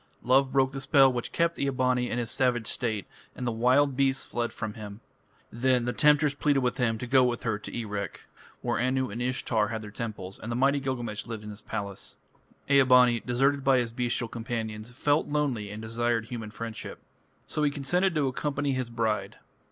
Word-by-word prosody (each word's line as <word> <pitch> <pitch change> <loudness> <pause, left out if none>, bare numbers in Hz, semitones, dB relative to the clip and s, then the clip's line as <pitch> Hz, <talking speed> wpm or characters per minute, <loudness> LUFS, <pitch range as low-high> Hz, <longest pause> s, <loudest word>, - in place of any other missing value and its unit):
Love 130 +2 +4
broke 135 -1 +3
the 135 0 -5
spell 135 -1 +5
which 120 -1 -3
kept 170 0 0
Ea 140 - +1
bani 125 -2 +1
in - - -2
his 120 -1 -2
savage 125 -3 +1
state, 110 -5 -2 0.3
and 125 - -5
the 120 - 0
wild 130 +5 +3
beasts 135 0 +1
fled 120 -1 -2
from 110 -3 -5
him. 105 -1 -9 0.5
Then 125 +1 +1
the 120 - -1
temptress 150 -1 +4
pleaded 145 -1 +1
with 125 +1 0
him 115 -4 +1
to 125 - -5
go 130 +1 +5
with 120 -1 0
her 110 -3 -1
to - - -9
Erech, 105 -3 -4 0.4
where 120 -3 -1
Anu 130 0 0
and 115 +4 -5
Ishtar 120 -3 0
had 110 -2 -4
their 105 - -8
temples, 105 -4 -6
and 115 - -6
the - - -1
mighty 135 +3 +3
Gilgamesh 120 -6 -4
lived 115 -2 -6
in 105 - -7
his 105 +1 -10
palace. 100 -3 -6 0.5
Ea 140 0 +6
bani, 125 -2 +5
deserted 135 +4 +1
by 135 -1 +4
his 120 -2 0
bestial 120 0 -1
companions, 115 -1 -4
felt 145 +5 +1
lonely 140 -8 -1
and 105 +2 -7
desired 115 0 0
human 115 -2 -6
friendship. 110 +1 -6 0.5
So 150 - -3
he 150 - +3
consented 170 +6 0
to 145 -3 +2
accompany 140 +2 -1
his 130 -2 -2
bride. 110 -4 -1
125 Hz, 200 wpm, -28 LUFS, 115-135 Hz, 0.5 s, Ea